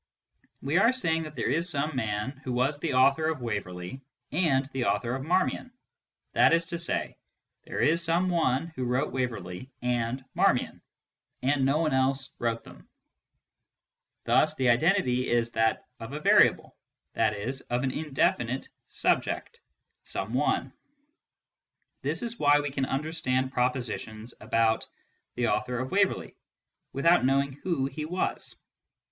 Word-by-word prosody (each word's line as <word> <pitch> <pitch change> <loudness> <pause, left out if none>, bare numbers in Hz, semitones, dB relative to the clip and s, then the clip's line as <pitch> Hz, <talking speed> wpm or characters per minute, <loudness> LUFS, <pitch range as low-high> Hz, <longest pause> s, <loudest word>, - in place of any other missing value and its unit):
We 145 +7 +2
are 230 +4 +5
saying 165 -11 0
that 155 -1 -9
there - - -1
is 170 +4 +1
some 150 -1 -1
man 110 +3 -2
who 130 - -3
was 135 +4 0
the 150 -4 -2
author 140 +4 +4
of 160 -4 -2
Waverley 100 +1 -4 0.3
and 140 -7 +2
the 130 -2 -1
author 120 0 0
of 130 +1 -3
Marmion. 185 - 0 0.6
That - - +5
is 165 0 0
to 170 -2 -3
say, 170 - -1 0.5
there - - -3
is 165 +2 +3
some 170 +2 +2
one 165 -3 +1
who 130 - -2
wrote 125 +4 0
Waverley 120 -4 -4
and 125 +1 -1
Marmion, - - +1 0.6
and 135 +1 +2
no 140 +2 +2
one 155 -3 +1
else 135 0 +1
wrote 115 -1 -1
them. - - -15 1.3
Thus 155 0 +3
the 130 -4 +2
identity 130 -2 +2
is 120 -1 +1
that 110 -1 +1
of 115 +4 -8
a 150 - -3
variable, - - +4 0.4
i.e. 110 +2 0 0.2
of 120 +1 0
an 130 - 0
indefinite 135 -4 -1 0.2
subject, 470 - -1 0.3
" - - -53
some - - -3
one." - - 0 1.3
This - - -1
is 235 0 -3
why 145 0 +5
we 145 -1 -3
can 135 -1 -1
understand 135 -3 -1
propositions 120 -3 -2
about 115 -1 +1 0.2
" - - -47
the 120 -2 +1
author 115 +4 -1
of 130 +1 -3
Waverley," 195 0 +1 0.6
without 170 +4 +3
knowing 135 +1 +2
who 145 -1 -2
he 150 +2 -4
was. 180 +4 -2
135 Hz, 150 wpm, -28 LUFS, 125-160 Hz, 1.3 s, are